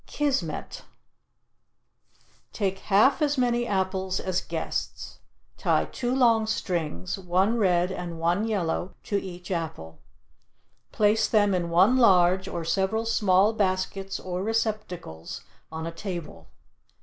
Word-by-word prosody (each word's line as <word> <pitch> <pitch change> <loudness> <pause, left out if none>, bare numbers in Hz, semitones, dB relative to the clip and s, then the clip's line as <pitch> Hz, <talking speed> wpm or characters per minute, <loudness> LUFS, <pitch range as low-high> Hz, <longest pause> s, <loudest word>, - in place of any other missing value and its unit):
KISMET 285 -2 -2 1.7
Take 195 -2 -2
half 215 +10 +3
as 290 -1 +1
many 240 -1 +1
apples 190 -1 -1
as 185 -1 -1
guests, - - -5 0.4
tie - - +2
two 245 0 -3
long 230 -4 +4
strings, 165 - -2
one 190 +5 +1
red 180 -2 +2
and 175 -2 -5
one 175 +6 +1
yellow, 185 -3 -2
to 200 -1 -1
each 180 -1 -8
apple. 150 - -4 0.9
Place 215 +1 +3
them 205 -2 +3
in 175 -2 -1
one 190 +9 +4
large 190 -5 +4
or 170 -2 -4
several 195 +6 0
small 205 -2 +3
baskets 195 -1 -1
or 180 0 -4
receptacles 210 - -3 0.3
on 160 0 -5
a 165 - -4
table. 170 - -7
190 Hz, 120 wpm, -26 LUFS, 175-220 Hz, 1.7 s, long